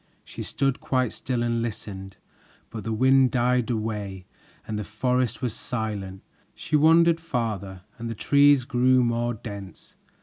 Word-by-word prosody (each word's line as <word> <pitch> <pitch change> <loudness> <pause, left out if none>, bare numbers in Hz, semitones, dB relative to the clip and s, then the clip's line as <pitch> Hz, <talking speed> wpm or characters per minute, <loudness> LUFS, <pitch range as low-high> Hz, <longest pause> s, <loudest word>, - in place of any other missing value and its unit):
She - - -8
stood 135 -2 -1
quite 130 -3 0
still 125 -2 -2
and 115 -1 0
listened, 100 -4 -6 0.5
but 110 -2 -6
the 115 - -3
wind 130 +3 +4
died 125 -1 +1
away 105 -5 -3 0.4
and 105 -1 -4
the - - -3
forest 125 +3 -1
was 120 -4 -1
silent. 105 -6 -4 0.3
She 155 - -2
wandered 165 +2 +5
farther, 105 - -3 0.2
and 115 0 -4
the 115 - -4
trees 140 +2 +4
grew 130 0 +3
more 120 0 0
dense. 100 -3 -10
120 Hz, 145 wpm, -25 LUFS, 105-130 Hz, 0.5 s, wandered